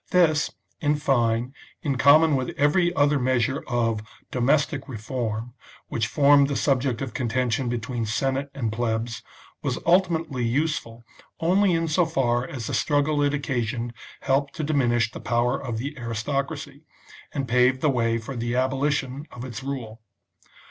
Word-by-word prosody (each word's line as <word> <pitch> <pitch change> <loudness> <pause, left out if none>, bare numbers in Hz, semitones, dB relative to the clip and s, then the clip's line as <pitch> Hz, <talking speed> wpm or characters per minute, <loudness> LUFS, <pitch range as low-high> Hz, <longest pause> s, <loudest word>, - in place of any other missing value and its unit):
This, 165 -4 +3 0.3
in 150 0 +2
fine, 120 -3 +1 0.3
in 140 -3 0
common 145 +3 +6
with 130 -2 -3
every 175 +5 +3
other 145 0 +3
measure 130 +1 +1
of 115 -3 0 0.3
domestic 140 +2 +1
reform, 115 -1 -4 0.4
which 110 -2 -1
formed 140 +1 +5
the 140 - -2
subject 135 -3 +1
of 125 -5 -6
contention 125 0 0
be 120 - -1
tween 115 0 -3
Senate 135 +5 -1
and 115 -6 -2
Plebs, 115 0 -2 0.4
was - - -1
ultimately 165 -6 +2
useful 120 -2 -1 0.4
only 185 +3 +3
in 165 0 +1
so 165 +2 +2
far 120 -6 +1
as 125 -5 -6
the - - -4
struggle 145 0 +1
it 145 0 +2
occasioned 120 -4 -2 0.3
helped 140 +4 0
to 160 - -3
diminish 120 -7 +2
the - - -8
power 120 +3 0
of 120 -3 -4
the 140 +6 -4
aristocracy, 140 +5 -3 0.5
and 140 -3 -3
paved 125 +2 +3
the 155 - +3
way 115 -2 +1
for 115 +4 -6
the 120 0 -2
abolition 135 +2 0
of 125 +1 -7
its" 125 -1 -6
rule. 125 -5 -6
130 Hz, 155 wpm, -25 LUFS, 120-145 Hz, 0.5 s, common